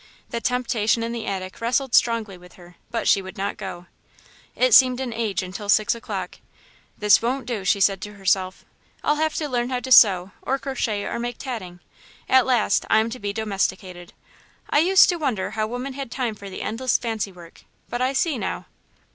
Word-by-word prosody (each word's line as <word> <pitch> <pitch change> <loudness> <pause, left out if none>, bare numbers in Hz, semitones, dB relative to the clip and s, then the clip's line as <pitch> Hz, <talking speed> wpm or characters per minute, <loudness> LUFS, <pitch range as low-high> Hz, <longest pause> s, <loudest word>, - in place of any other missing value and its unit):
The 235 - -3
temptation 235 -3 0
in 230 - -3
the 235 -1 -5
attic 190 0 -5
wrestled 250 +2 0
strongly 225 -4 +2
with 180 0 -16
her, 175 -1 -16
but 230 - -2
she 195 - +4
would 190 0 -10
not 200 +1 -2
go. 190 -4 -7 0.7
It 255 -2 +2
seemed 255 +1 +6
an 255 -3 -3
age 215 -5 -2
until 195 +3 -7
six 215 +1 +4
o'clock. 235 - -6 0.6
"This 210 0 +5
won't 255 +3 -2
do," 230 -6 -4
she 200 +1 +2
said 195 -1 +2
to 210 - -7
herself; 190 -1 -1 0.4
"I'll 295 - +2
have 315 0 0
to 305 - -2
learn 245 -2 -1
how 250 -1 -1
to 260 - -7
sew, 195 -6 +6
or 270 - -1
crochet, 240 -7 -3
or - - -3
make 240 0 -4
tatting. 185 -10 -7 0.5
At 260 -1 +4
last, 245 -4 +2
I - - +5
am 220 +1 +1
to 255 - -6
be 205 0 -3
domesticated. 190 -4 -3 0.6
I - - +4
used 370 +4 +6
to 350 - +1
wonder 250 - -2
how 215 0 -2
women 250 +4 -5
had 275 -2 -6
time 245 -2 -2
for 200 -1 -10
the 190 - -6
endless 250 +3 0
fancy 220 -4 -3
work, 175 -2 -15 0.3
but 240 - -4
I 260 +2 +1
see, 280 -1 0
now." 190 - -4
225 Hz, 200 wpm, -23 LUFS, 195-255 Hz, 0.7 s, seemed